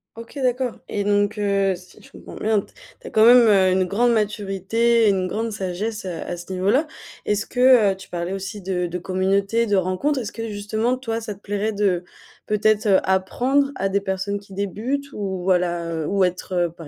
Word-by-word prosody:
OK 230 +5 -11
d'accord 250 -1 0
et 205 - -2
donc 205 +1 +1
heu, 195 -1 +1
si 180 0 -16
je - - -17
comprends - - -12
bien 215 -1 +1
t - - -18 0.3
tu 485 - -11
as - - -5
quand 220 0 +4
même, 240 -1 +8
heu, 190 -3 +5
une 185 0 +2
grande 235 +6 +2
maturité, 215 +2 +1
une 190 -2 +1
grande 225 +5 -3
sagesse, 205 +2 -4
heu, 185 - -3
à 175 +1 -5
ce 175 +2 -8
niveau-là. 200 - +2 0.4
Est-ce 210 +1 -1
que 245 -6 +4
tu 190 - -14
parlais 175 +1 -4
aussi 195 +2 -5
de 180 -1 -2
de 175 +1 -4
communauté, 195 +5 0
de 205 -2 +1
rencontres, 190 +10 0
est-ce 225 -5 -5
que 230 0 -5
justement 220 +5 -1
toi 230 -3 -3
ça 220 -2 -6
te 195 - -18
plairait 205 +2 -2
de 195 -4 +1 0.4
peut-être, 215 0 +1
heu, 195 -2 +5
apprendre 250 +9 +1
à 195 -4 -1
des 200 +1 0
personnes 195 +1 -2
qui 200 -1 -16
débutent 230 +9 -3
ou 190 -3 -4
voilà, 175 -2 0
heu, 160 -2 -3
ou 195 -1 +2
être, 180 +1 -2
heu, - - -2
par 165 -2 -12
200 Hz, 205 wpm, -22 LUFS, 190-225 Hz, 0.4 s, même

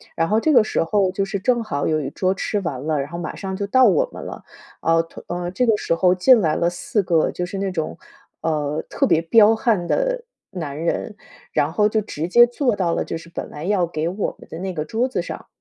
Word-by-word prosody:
然 165 +1 0
后 215 +1 +3
这 310 +5 +2
个 235 - +7
时 215 - -1
候 190 +2 +1
就 195 +1 -1
是 195 0 -3
正 240 +2 +2
好 145 -10 -2
有 155 -1 +1
一 135 - -3
桌 185 0 0
吃 205 +2 -2
完 145 -7 -4
了， 155 -2 0
然 140 - -6
后 170 - -6
马 175 - -5
上 190 -1 -5
就 200 -1 -3
到 260 +4 +5
我 - - +3
们 - - -8
了， - - -8 0.4
啊， 165 0 +3 0.3
呃， 175 0 -3
这 250 +7 +1
个 220 -3 +3
时 165 - -1
候 180 +1 +3
进 240 +6 +6
来 155 -4 +1
了 170 - +1
4 185 +3 -2
个 165 -3 +2
就 180 - -3
是 185 +3 -6
那 195 0 -1
种， 160 -3 -3 0.4
呃， 150 -1 -1
特 - - +1
别 160 - +3
彪 215 +6 +5
悍 215 -7 +1
的 - - 0 0.3
男 155 -7 -5
人， 200 +5 -2 0.3
然 150 +3 0
后 210 +4 +3
就 220 - +1
直 165 -5 -5
接 240 +5 +7
坐 245 -1 0
到 170 -3 +1
了 - - 0
就 - - -4
是 165 +1 -13
本 170 - -6
来 150 +3 -7
要 195 -3 +2
给 155 -1 -2
我 195 +3 -3
们 - - -14
的 - - -7
那 190 0 -4
个 155 -3 -3
桌 225 +9 0
子 - - -1
上。 - - -7
185 Hz, 265 characters per minute, -21 LUFS, 165-215 Hz, 0.4 s, 个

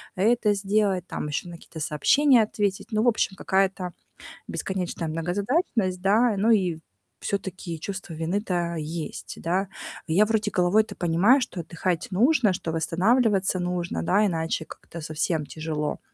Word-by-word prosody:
это 210 +2 +3
сделать, 195 -2 +1
там, - - -4
ещё 150 +4 -3
на 170 - -8
какие-то 165 -1 -11
сообщения 240 - +4
ответить". 205 -2 -2
Ну, 215 +1 +1
в - - +2
общем, 215 -3 0
какая-то 190 -2 0 0.6
бесконечная 180 -3 -3
многозадачность, 185 - -1
да, 220 +5 +4
и - - -5
ну, 215 +4 +3
и 180 -7 +2 0.4
всё-таки 185 -4 -4
чувство 190 0 -6
вины-то 175 0 -1
есть, 155 +1 -5
да. 185 +4 0 0.4
Я 180 +6 +4
вроде 215 -1 0
головой-то 190 +5 +2
понимаю, 180 +10 +4
что 210 -7 -4
отдыхать 170 +1 -2
нужно, 230 +2 +4
что 170 -2 -4
восстанавливаться 190 +4 +2
нужно, 175 -1 -2
да, 200 +5 +3
иначе 165 -3 -1
как-то 170 +2 -10
совсем 155 0 -1
тяжело. 155 0 -3
185 Hz, 140 wpm, -25 LUFS, 165-210 Hz, 0.6 s, сообщения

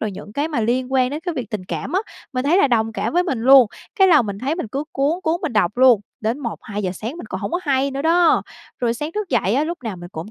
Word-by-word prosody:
rồi 215 - -2
những 205 +2 -10
cái 290 +5 -1
mà 290 -8 -1
liên 250 +3 -1
quan 255 -1 +2
đến 300 +2 -4
cái 350 -1 -4
việc 245 -6 -5
tình 205 -5 -4
cảm 260 - -5
á, 380 - +2 0.3
mình 255 +1 -2
thấy 325 +6 +3
là 285 - +4
đồng 225 -2 +1
cảm - - -2
với 355 +1 +3
mình 270 -11 -2
luôn, 260 0 +7 0.3
cái 385 -1 +6
là 305 -7 +6
mình 200 -2 -5
thấy 275 +7 -1
mình 345 - -4
cứ 280 +6 -3
cuốn, 295 +6 0
cuốn 330 +2 0
mình - - -2
đọc 210 0 +1
luôn, 250 -4 +6 0.2
đến 225 +5 -1
1:00-2:00 210 -6 -4
sáng 230 - -6
mình 235 - -8
còn 190 - -5
hổng 200 - -3
có 350 +2 -1
hay 275 -1 +1
nữa 275 +1 -4
đó. 335 +1 +4 0.4
Rồi 235 -1 +1
sáng 300 +6 -5
thức 420 -3 -3
dậy 200 - +1
á, 290 +3 +2
lúc 340 +1 -4
nào 210 -5 -4
mình 175 0 -9
cũng 165 +7 -7
260 Hz, 290 wpm, -21 LUFS, 220-315 Hz, 0.4 s, luôn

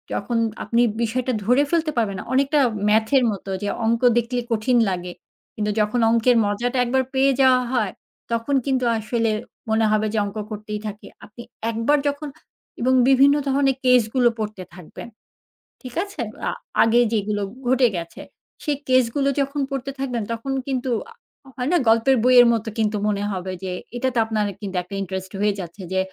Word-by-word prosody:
যখন 240 - -2 0.3
আপনি 235 +1 +1 0.2
বিষয়টা 245 +3 -1
ধরে 250 +6 +4
ফেলতে 330 -1 +1
পারবেনা, 200 -5 -1
অনেকটা 275 +3 +2 0.3
math 220 +1 +2
এর 260 - +3
মতো, 195 -1 -7
যে 205 - -1 0.2
অংক 230 +1 +1 0.2
দেখলে 240 +1 0
কঠিন 230 +3 +2
লাগে। 180 -1 -4 0.4
কিন্তু 210 0 -1
যখন 210 +3 +1
অঙ্কের 235 +1 +3
মজাটা 240 +5 -1
একবার 260 +2 +1
পেয়ে 270 +1 +3
যাওয়া 260 -1 +5
হয়, 215 -6 +1 0.4
তখন 230 +5 0
কিন্তু 260 -2 0
আসলে 225 +1 -1 0.4
মনে 220 0 +2
হবে 215 0 +2
যে - - -1
অঙ্ক 200 +1 -7
করতেই 210 0 -5
থাকি। 210 0 -8 0.2
আপনি 225 +3 -12 0.3
একবার 230 +6 +2
যখন 285 +1 -2 0.5
এবং 255 +2 +2 0.2
বিভিন্ন 275 +2 +6
ধরনের 270 0 +2
কেস 250 -1 +6
গুলো 245 -2 +5
পড়তে 210 -3 -4
থাকবেন। 180 +3 -10 0.7
ঠিক 255 -2 -9
আছে? 400 0 -7 0.3
আ - - -1 0.3
আগে 230 +2 +3
যেগুলো 210 -1 -1 0.3
ঘটে 255 0 +4
গেছে, 170 -1 -6 0.4
সে 300 - -1 0.2
কেস 255 -1 +4
গুলো 280 -1 +2
যখন 280 +1 -2
পড়তে 275 0 -3
থাকবেন 250 -5 -2
তখন 230 +4 -4 0.2
কিন্তু 260 -1 -2 0.2
আ - - -13 0.4
হয় 250 +2 -2
না? - - +5
গল্পের 230 +4 +4
বইয়ের 250 -1 +7
মতো 225 0 -2
কিন্তু 215 -1 +1
মনে 205 -1 -1
হবে 185 -1 -4
যে 185 - -3 0.2
এটাতে 250 0 -1
আপনার 220 -1 -1 0.2
কিন্তু 195 -2 -6
একটা 180 +3 -9
ইন্টারেস্ট 190 -1 -5
হয়ে 210 0 +2
যাচ্ছে। 180 +2 -8
যে 190 - +1
235 Hz, 170 wpm, -22 LUFS, 210-260 Hz, 0.7 s, বইয়ের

